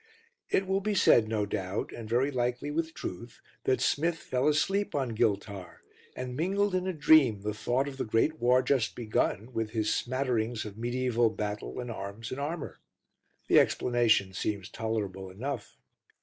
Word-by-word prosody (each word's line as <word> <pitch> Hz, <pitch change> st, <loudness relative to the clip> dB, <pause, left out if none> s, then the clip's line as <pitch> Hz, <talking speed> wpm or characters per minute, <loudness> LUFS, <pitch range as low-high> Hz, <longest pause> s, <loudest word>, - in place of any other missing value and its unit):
It 190 Hz, -, +2 dB
will 190 Hz, +1 st, 0 dB
be 210 Hz, +1 st, -1 dB
said, 115 Hz, -, +5 dB
no 110 Hz, -2 st, 0 dB
doubt, 100 Hz, -1 st, -3 dB
and 115 Hz, -2 st, -8 dB
very 125 Hz, +5 st, +2 dB
likely 125 Hz, +2 st, -1 dB
with 165 Hz, +1 st, -2 dB
truth, 115 Hz, +6 st, -7 dB, 0.3 s
that 130 Hz, -, +2 dB
Smith 165 Hz, +3 st, +1 dB
fell 130 Hz, -3 st, -1 dB
asleep 195 Hz, +7 st, +1 dB
on 130 Hz, -5 st, -1 dB
Giltar, 100 Hz, -4 st, -2 dB, 0.3 s
and 125 Hz, -1 st, -5 dB
mingled 195 Hz, +6 st, +1 dB
in 185 Hz, 0 st, 0 dB
a -, -, +1 dB
dream 150 Hz, -, +5 dB
the 105 Hz, +1 st, -2 dB
thought 125 Hz, +5 st, 0 dB
of 135 Hz, -1 st, -7 dB
the -, -, -1 dB
great 115 Hz, +8 st, +1 dB
war 125 Hz, +2 st, +4 dB
just 130 Hz, -6 st, +1 dB
begun 115 Hz, 0 st, -1 dB
with 110 Hz, -2 st, -1 dB
his 110 Hz, -1 st, +2 dB
smatterings 120 Hz, -3 st, -1 dB
of 105 Hz, -, -6 dB
mediæval 120 Hz, 0 st, 0 dB
battle 105 Hz, +2 st, -4 dB
and 120 Hz, -1 st, -4 dB
arms 100 Hz, +1 st, -6 dB
and 130 Hz, -, -4 dB
armour. 155 Hz, +2 st, -4 dB, 0.7 s
The -, -, +7 dB
explanation 115 Hz, -6 st, +2 dB
seems 100 Hz, +1 st, -3 dB
tolerable 100 Hz, -4 st, -3 dB
enough. 120 Hz, +4 st, -5 dB
120 Hz, 165 wpm, -29 LUFS, 110-140 Hz, 0.7 s, The